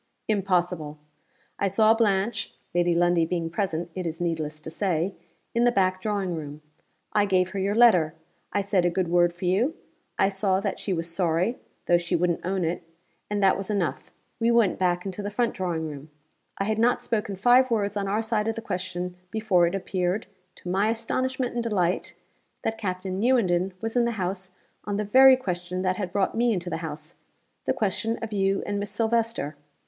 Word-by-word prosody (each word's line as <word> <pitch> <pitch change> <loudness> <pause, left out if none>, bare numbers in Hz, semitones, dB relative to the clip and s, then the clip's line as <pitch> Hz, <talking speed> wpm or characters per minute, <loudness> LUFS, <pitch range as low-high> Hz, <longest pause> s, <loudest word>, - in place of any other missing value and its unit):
Impossible. 180 -7 0 0.6
I 200 - +2
saw 215 +3 +5
Blanche 205 -1 0 0.2
(Lady 175 0 +2
Lundie 175 -1 +3
being 165 -1 -2
present, 170 -2 -2
it 185 -1 -3
is 165 0 -5
needless 160 -3 -2
to 160 - -7
say) 180 0 0 0.4
in 235 - +2
the 245 - +5
back 185 -3 +1
drawing 200 -4 -1
room. 150 -2 -7 0.5
I 205 -1 +4
gave 185 -2 +2
her 200 - -3
your 200 +2 0
letter; 180 -9 +5 0.4
I 200 - +1
said 195 -2 +1
a 175 - +3
good 175 0 -1
word 175 0 +4
for 175 +2 -7
you; 220 - +2 0.4
I 195 - +4
saw 195 -1 +1
that 200 0 -3
she 200 - -3
was 165 -2 -1
sorry, 180 +7 +1 0.3
though 175 0 +4
she 170 0 -1
wouldn't 175 0 0
own 185 -1 -1
it 170 +3 -2 0.5
and 205 -1 0
that 190 - +5
was 195 +1 -5
enough. 200 -6 -1 0.3
We 230 0 +2
went 235 -5 +3
back 180 0 +1
into 195 +1 -4
the 205 - -3
front 235 +3 0
drawing 170 -4 -2
room. 145 0 -8 0.5
I - - 0
had 215 +2 -1
not 240 +2 +2
spoken 210 -3 -1
five 245 +6 +5
words 205 -3 0
on 200 -1 -1
our 210 +3 0
side 220 -1 0
of 225 - 0
the - - -4
question 180 -1 -4
before 205 -5 +2
it 175 - -2
appeared, 185 +1 -1 0.3
to - - -12
my 200 +3 +2
astonishment 255 +3 -1
and 240 - -1
delight, 185 -6 0 0.5
that 225 0 -2
Captain 185 -2 -3
Newenden 190 -7 +2
was 225 +1 -3
in 240 -1 +4
the 235 - 0
house 185 0 -3 0.3
on 205 -1 -2
the 210 - 0
very 260 +5 +8
question 180 -6 -3
that 185 0 +1
had 185 -4 -3
brought 195 -1 +1
me 235 0 +2
into 175 -2 -3
the - - -1
house 155 -1 -7 0.5
the - - +2
question 220 +2 -1
of 220 -1 -5
you 195 -1 +1
and 205 0 -2
Miss 205 0 -3
Silvester. 225 -7 0
190 Hz, 195 wpm, -26 LUFS, 175-215 Hz, 0.6 s, very